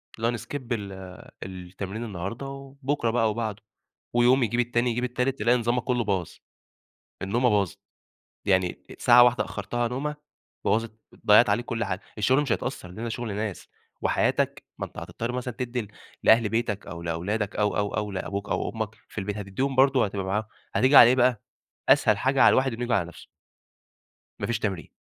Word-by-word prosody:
اللي 115 +1 -1
هو - - +2
نskip 145 +6 -6
ال 105 -4 -2 0.5
التمرين 95 +3 -6
النهاردة 100 +4 -5
وبُكرة 135 -1 -3
بقى 120 0 +1
أو 110 -1 +2
بعده 110 -2 -4 0.5
ويوم 125 +2 +4
يجيب 120 +1 +1
التاني 120 0 +1
يجيب 120 +2 -1
التالت، 125 +2 -1
تلاقي 120 +3 +3
نظامَك 120 +1 0
كُلّه 125 -2 0
باظ، 95 -5 -1 0.9
النومة 120 +6 +2
باظت 100 -1 +1 0.7
يعني 95 -3 +1 0.2
ساعة 120 0 +7
واحدة 120 0 +3
أخرّتها 120 +4 -2
نومة 140 +5 -3 0.5
بوظت 115 0 +1 0.3
ضيعت 105 +2 +7
عليك 110 +4 +1
كل 115 -1 -2
حاجة 95 -1 -3 0.2
الشغل 130 +7 +3
مش 140 -5 -2
هيتأثر، 90 - -3
لأن 110 +6 -7
ده 120 - -2
شغل 115 -3 -4
ناس 105 -2 -4 0.3
وحياتَك - - +1
ما - - -3
أنت - - -15
هتضطر 115 +1 -4
مثلًا 125 0 -4
تدّي 125 -2 -3 0.4
لأهل 110 -1 +5
بيتَك 115 -3 -2
أو 85 -1 -7
لأولادَك 95 +6 -2
أو، 105 0 +1
أو، 105 -1 -1
أو، 105 -1 -2
لأبوك 100 +1 -4
أو - - -1
أمَّك 110 -1 -4
في - - -17
البيت 105 0 -3
هتدّيهم 105 +7 -2
برضه 135 -2 +4
هتبقى 100 -1 -4
معاهم 100 +3 0 0.3
هتيجي 130 +3 +4
علي 120 - +10
إيه 125 - +4
بقى 125 -3 +3 0.5
أسهل 105 - +5
حاجة 135 +4 +2
على - - +8
الواحد 130 0 +2
إنه 115 - -6
ييجي 120 0 0
على 100 -4 +2
نفسه. 85 - -13 1.1
ما - - -1
فيش 120 -2 -1
تمرين. 95 -6 -3
115 Hz, 180 wpm, -26 LUFS, 100-125 Hz, 1.1 s, علي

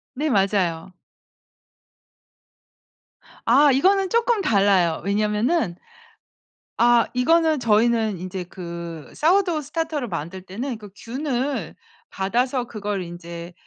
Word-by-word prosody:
네. 300 +3 -1
맞아요. 190 -5 0 2.6
아, 275 +5 +6
이거는 380 +8 +3
조금 465 -2 +2
달라요. 195 - +2
왜냐면은 210 - 0 1.0
아 235 0 +5
이거는 315 +3 +3
저희는 220 -2 +2
인제 185 0 -5
그 170 -3 -8
사워도우 345 -1 +2
스타터를 305 -3 -3
만들 170 +2 -5
때는 230 +6 -5
그 205 -2 -12
균을 265 +2 -3 0.3
받아서 245 +6 0
그걸 205 -4 -4
인제 170 0 -8
225 Hz, 215 characters per minute, -23 LUFS, 185-285 Hz, 2.6 s, 아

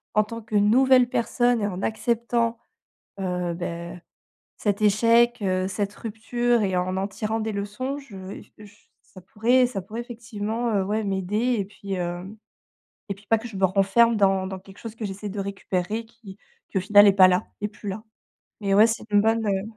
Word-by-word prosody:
en 215 - +5
tant 230 +2 -8
que 215 0 -6
nouvelle 250 +5 +5
personne 240 -1 +1
et 205 - 0
en 185 -1 -5
acceptant, 235 +1 0 0.6
heu, 180 -2 -2
bah, 170 0 -5 0.6
cet 205 -1 -1
échec, 230 +3 +4
heu, 185 -1 0
cette 200 +1 -2
rupture 235 +1 -1
et 190 -2 0
en 185 +1 -1
en 195 +1 -1
tirant 215 +2 -3
des 220 0 -2
leçons. 210 +8 -4
Je 195 -8 -9
f - - -21
je 215 - -12
s 205 0 -19
ça 185 - -15
pourrait 240 +7 +2
ça 235 -6 -5
pourrait 215 +5 -6
effectivement, 225 -2 -3
ouais, 215 +3 -1
m'aider 205 +5 0
et 200 - -1
puis, 200 0 -7
hem, 180 +3 -4 0.7
et 200 - -2
puis 200 +2 -21
pas 225 +2 +3
que 235 +2 -8
je 210 - -9
me 190 - +1
renferme 195 +5 +4
dans 195 -2 +2
dans 190 0 -5
quelque 195 0 -16
chose 225 -2 -8
que 230 - -7
j'essaie 200 +1 -6
de 200 +1 -4
récupérer, 195 +2 -3
qui 220 -4 -14 0.3
qui 195 - -1
au - - -1
final 205 +2 +6
est 200 - +6
pas 190 -1 +7
là, 180 0 +1 0.2
est 210 - -1
plus 205 0 -10
là. 205 +3 -5 0.6
Mais 195 -1 +1
ouais, 215 +3 +7
c'est 230 +1 -3
une 205 0 +5
bonne, 225 0 +1
heu 195 -1 0
210 Hz, 200 wpm, -24 LUFS, 195-230 Hz, 0.7 s, pas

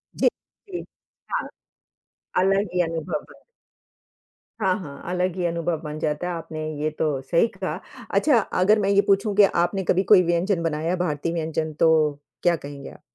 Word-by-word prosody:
जी, - - +3 0.4
जी। 360 -2 -5 0.5
हाँ। - - -1 0.9
अलग 195 +2 +2
ही 180 - +3
अनुभव 165 -1 -2
बन - - -17 1.2
हाँ, 190 -1 +2
हाँ, 140 -6 -9
अलग 180 0 0
ही 180 -2 -1
अनुभव 170 -1 -1
बन 150 -1 -6
जाता 150 +4 -1
है 180 - -2
आपने 160 -1 -6 0.2
ये 155 - +1
तो 150 -4 +1
सही 170 - +2
कहा। - - -4 0.4
अच्छा, 290 -6 +4
अगर 210 +1 +2
मैं 200 -1 +1
ये 200 0 +5
पूछूँ 200 +1 +2
कि 205 - +7
आपने 190 +1 +2
कभी 185 +2 +2
कोई 195 -3 +9
व्यंजन 175 +1 +1
बनाया 160 0 -1
है, 180 - +2
भारतीय 165 -1 -1
व्यंजन 160 -1 -2
तो 165 - +5 0.5
क्या 175 -1 +4
कहेंगे 140 -3 -8
आप? - - -15
175 Hz, 175 wpm, -24 LUFS, 160-195 Hz, 1.2 s, कोई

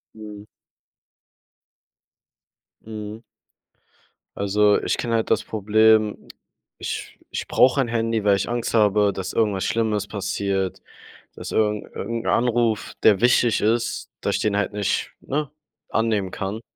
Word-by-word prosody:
Mhm. 105 -1 -10 2.4
Mhm. 110 0 -8 1.2
Also, 105 +1 +3
ich - - -1
kenne 120 -1 -2
halt 110 - -1
das 110 0 +2
Problem. 110 0 +2 0.5
Ich - - -6 0.2
ich - - -3
brauche 130 +2 +4
ein 120 - -1
Handy, 115 -2 -1
weil 100 -1 +4
ich 100 - -2
Angst 120 0 -2
habe, 105 -2 +4
dass 95 -1 -5
irgendwas 105 -4 +1
Schlimmes 110 -3 0
passiert, 100 -2 -2 0.5
dass - - -7
irgend 105 -1 -1
irgend 115 0 -4
'n - - -6
Anruf, 120 -2 +1
der 105 -2 +5
wichtig 120 -2 +3
ist 120 +2 0
dass - - 0
ich - - -3
den 105 -1 0
halt 105 0 -1
nicht, 100 -1 -1
ne, 145 0 -3 0.4
annehmen 110 -4 0
kann. 100 +3 -4
110 Hz, 135 wpm, -23 LUFS, 105-115 Hz, 2.4 s, der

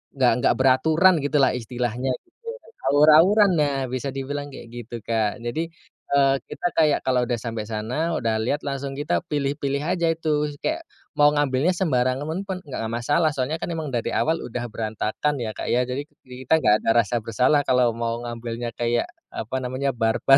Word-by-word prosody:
nggak 125 -3 +4
nggak - - +4
beraturan 160 +8 +4
gitulah 145 -3 +3
istilahnya 125 +1 -2
gitu. 460 +7 -24 0.4
Awur-awuran, 165 +8 +6
nah 145 -2 +1
bisa 130 +2 -3
dibilang 145 +2 -4
kek 120 - -10
gitu, 120 0 -7
Kak. 110 0 -1
Jadi, 160 +8 -3 0.4
eee, 135 -1 +4
kita 175 - -2
kayak 155 -3 +4
kalo 125 -1 +2
udah 120 - 0
sampe 115 -1 -4
sana 125 +10 -2
udah 115 -2 0
lihat 145 +5 0
langsung 140 0 -3
kita 150 +3 -1
pilih-pilih 140 0 -1
aja 175 -2 +1
itu. 150 -2 0
Kayak 330 +2 -1 0.3
mau 145 0 +5
ngambilnya 145 +3 +2
sembarangan 145 +2 0
pun 185 -1 -3
nggak 130 -5 -5
masalah. 145 +7 +1
Soalnya 135 +2 -1
kan - - -3
emang 160 -2 -3
dari 115 - -1
awal 160 +1 +1
udah 120 0 -4
berantakan 110 +6 -2
ya, 110 - -3
Kak, - - -4
ya. 125 +1 +2
Jadi 130 +3 -3 0.2
kita 130 +5 0
nggak 105 -6 +3
ada - - 0 0.2
rasa 120 - -1
bersalah 125 +7 +2
kalau 125 -2 +4
mau 115 0 -2
ngambilnya 120 0 -5
kayak 120 0 0 0.2
apa 115 +4 -5
namanya 130 +1 -2
barbar 115 +4 +4
135 Hz, 170 wpm, -24 LUFS, 120-150 Hz, 0.4 s, Awur-awuran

